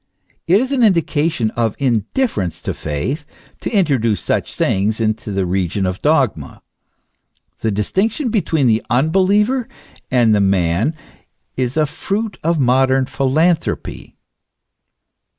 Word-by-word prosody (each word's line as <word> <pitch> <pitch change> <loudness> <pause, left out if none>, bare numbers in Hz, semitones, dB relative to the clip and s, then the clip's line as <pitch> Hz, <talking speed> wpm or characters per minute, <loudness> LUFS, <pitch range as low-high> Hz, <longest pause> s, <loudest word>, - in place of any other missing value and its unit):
It 185 +4 +5
is 260 +3 -2
an 270 -3 +1
indication 165 - +1
of 115 -3 -1
indifference 115 - -1
to - - -2
faith, 80 - -3 0.4
to - - -4
introduce 135 - +1
such - - -2
sayings 105 +4 0
into 110 -1 -1
the 95 -1 -1
region 95 +1 -1
of 90 0 -3
dogma. 135 - 0 1.0
The 110 - -1
distinction 195 - -1
between 165 - +1
the 115 -2 +2
unbeliever 195 - +2 0.4
and 120 -4 +3
the 105 - +3
man 95 - +1 0.6
is 130 +2 -2
a 155 - +3
fruit 205 +8 -4
of 165 +1 +1
modern 130 +1 +3
philanthropy. 155 +6 -1
130 Hz, 120 wpm, -18 LUFS, 105-170 Hz, 1.0 s, It